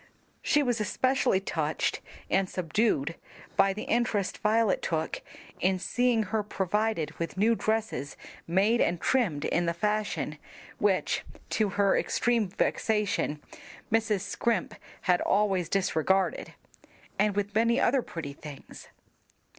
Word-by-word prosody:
She 295 -1 +3
was 245 -4 0
especially 255 -1 +2
touched 160 -5 -1 0.3
and 190 0 +1
subdued 170 -4 0 0.4
by 195 - +4
the 205 +2 -5
interest 220 -5 0
Violet 215 -1 +2
took 160 -2 -2 0.4
in 185 +1 +2
seeing 240 +4 +1
her 215 +2 -1
provided 205 -3 -1
with 170 +2 -4
new 220 +4 +4
dresses 215 - -2 0.3
made 200 +7 +3
and 170 0 +1
trimmed 180 - +1
in 175 0 +1
the 170 - 0
fashion 195 -7 -1 0.4
(which, 200 -2 +1 0.3
to 215 -2 +1
her 200 -1 +4
extreme 235 -3 +1
vexation, 205 -5 0 0.5
Mrs. 220 -3 +2
Scrimp 225 +3 -1 0.3
had 180 -1 +2
always 195 -4 +1
disregarded), 190 0 +1 0.6
and 210 -1 +2
with 205 0 -1
many 230 +3 +3
other 270 - +3
pretty 160 -9 -6
things. 145 -1 -11
200 Hz, 125 wpm, -28 LUFS, 175-220 Hz, 0.6 s, by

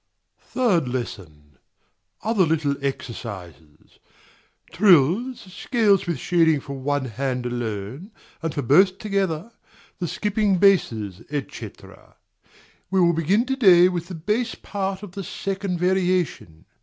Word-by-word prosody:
Third 200 - +1
Lesson. 80 - -7 0.6
Other 215 -2 +2
little 155 -3 +1
exercises; 95 - -7 0.7
trills, 190 - +3
scales 210 -7 +2
with 170 - -1
shading 165 -4 +2
for 140 - -7
one 140 0 -2
hand 125 +1 -3
alone 120 - -4 0.3
and 165 -1 -2
for 145 - -3
both 185 +9 +4
together; 195 -2 -2 0.5
the 175 - -2
skipping 210 +1 0
basses, 115 - +2
&c. 145 -2 -5 1.2
We 190 - +1
will 170 -1 +4
begin 185 +9 +1
to 265 +1 -1
day 185 -8 +6
with 175 -2 -4
the 185 - -7
bass 215 +8 -1
part 195 0 -4
of 205 - -8
the 195 +2 -6
second 195 -1 -3
variation. 180 - -1
170 Hz, 120 wpm, -23 LUFS, 130-195 Hz, 1.2 s, day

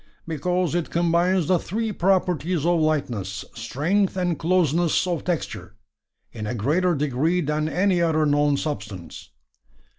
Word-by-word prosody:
"Because 175 +2 -1
it 175 -2 -1
combines 175 +1 +2
the 180 +1 +2
three 220 +5 -3
properties 180 -4 +1
of 175 -1 +3
lightness, 115 -11 -1
strength, 165 - 0
and 175 -3 0
closeness 170 -1 +2
of 175 -3 -2
texture, 110 - -4 0.6
in 110 -2 -6
a 120 - -3
greater 165 - +1
degree 150 +5 0
than 150 -1 -1
any 180 0 +2
other 160 -2 +2
known 145 -1 +2
substance." 100 - -6
160 Hz, 130 wpm, -24 LUFS, 140-180 Hz, 0.6 s, of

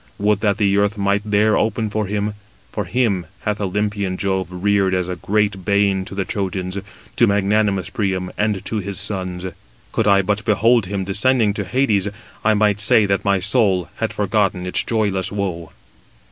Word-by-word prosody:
Would 105 0 +1
that 100 -2 +1
the 100 -2 +2
earth 100 +1 +1
might 100 0 +1
there 105 0 +2
open 110 0 0
for 110 -1 -1
him, 105 +1 -2 0.4
for 105 - -3
him 100 -5 0
hath 105 0 -2
Olympian 100 -1 -1
Jove 95 -2 -1
reared 95 +1 +1
as 90 -1 -1
a 90 - -3
great 100 0 -1
bane 100 -1 +1
to 95 - -8
the 100 -1 -1
Trojans, 95 -2 -3 0.4
to 120 - +5
magnanimous 100 -1 +1
Priam, 95 -3 -2
and 105 -2 -1
to 110 - -2
his 100 -1 -4
sons. 90 -2 -3 0.5
Could 110 - 0
I 100 -1 +5
but 105 +2 -1
behold 115 0 +3
him 100 0 -2
descending 105 +3 +2
to 105 -1 -3
Hades, 105 -3 +1 0.4
I 110 0 +3
might 105 -1 +2
say 105 0 +5
that 100 -1 0
my 100 -1 +2
soul 95 -3 +2
had - - -1
forgotten 100 -3 0
its 90 - +1
joyless 100 -4 -1
woe." 95 -5 -4
100 Hz, 175 wpm, -20 LUFS, 95-105 Hz, 0.5 s, to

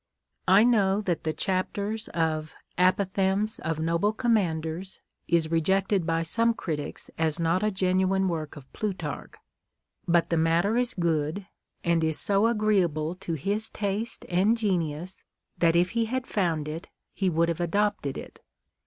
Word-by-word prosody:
I 195 +3 +7
know 205 -5 +3
that 175 -6 -2
the 155 - +1
chapter 200 +4 -1 0.2
of 155 -2 -1
" - - -41
Apothegms 190 +3 +1
of 160 -1 -2
Noble 170 +6 +1
Command 200 -10 +1
ers 175 +4 -6
" - - -58
is 165 -1 +1
rejected 190 +2 +1
by 165 0 +1
some 230 +7 +2
critics 150 -7 -5
as 160 0 +1
not 165 +2 +1
a 215 - +2
genuine 190 0 +1
work 160 -4 -3
of 135 -3 -13
Plutarch; 205 -3 -4 0.7
but 170 -1 +2
the 165 - +2
matter 165 +6 +2
is 245 0 0
good, 165 +1 -1 0.4
and 170 -2 +2
is 160 -1 0
so 200 +2 +3
agreeable 190 -8 +1
to 170 - -4
his 200 +8 -2
taste 205 +3 -3
and 195 +6 +2
genius, 180 -4 -2 0.4
that 165 -1 +4
if 175 +1 +3
he 230 0 +1
had 255 +3 -2
found 165 - -1
it, 160 +3 -6 0.3
he 190 -2 0
would 170 0 +2
have 170 +1 -2
adopted 200 -5 0
it. - - -10
180 Hz, 160 wpm, -27 LUFS, 165-205 Hz, 0.7 s, I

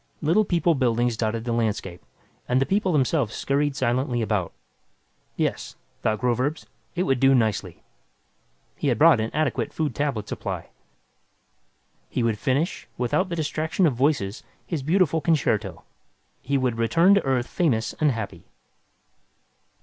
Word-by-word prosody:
Little 170 +8 +2
People 175 -2 +2
buildings 120 -3 +1
dotted 110 +1 -2
the 120 - -3
landscape, 105 -6 -2 0.5
and 125 +1 +3
the 135 - +2
people 195 +1 +1
themselves 135 -5 +1
scurried 140 +1 0
silently 125 -2 0
about. 100 -5 -1 0.8
Yes, - - -2 0.3
thought 110 0 +1
Groverzb, 125 +5 0 0.3
it 180 - +1
would 135 -8 +1
do 135 +1 +5
nicely. 105 -7 -1 0.9
He - - -3
had - - +2
brought - - +6
an 110 +1 -1
adequate 155 -4 -1
food 155 -2 -2
tablet 135 -8 -2
supply. - - -5 1.4
He 125 - -1
would 110 -3 0
finish, 140 - -1
without 125 +10 0
the 170 - -2
distraction 155 +3 0
of 150 - +3
voices, 120 -6 0 0.2
his 165 -5 -3
beautiful 165 +1 +2
concerto. 155 -3 0 0.6
He 140 +1 0
would 125 -3 -1
return 165 - +4
to 200 - +3
Earth 130 -3 0
famous 120 -11 0
and 150 -2 +3
happy. 110 -4 -6
135 Hz, 140 wpm, -24 LUFS, 115-155 Hz, 1.4 s, brought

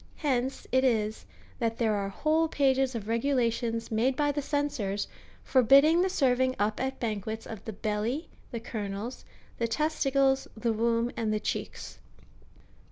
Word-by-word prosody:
Hence 265 -3 -1
it 260 0 +3
is, 220 -4 0 0.3
that 230 -1 -1
there 225 -2 +2
are 200 -1 -1
whole 315 +9 +1
pages 270 -3 +2
of 215 -3 -5
regulations 230 -1 0
made 240 +4 +2
by 290 +1 +2
the 290 +1 -2
cen 290 +1 0
sors, 205 -6 -2 0.4
forbidding 275 +6 +5
the 380 - +2
serving 260 -6 +2
up 210 +1 0
at 265 +1 -2
banquets 220 0 -3
of 220 -2 -8
the 220 - -5
belly, 215 - -2 0.2
the 235 - -4
kernels,^ 215 +1 -5 0.4
the 230 - +1
testicles, 275 -1 +1
the 230 0 0
womb, 230 +2 +1
and 225 -2 -1
the 215 - +1
cheeks. - - -5
240 Hz, 155 wpm, -29 LUFS, 220-270 Hz, 0.4 s, forbidding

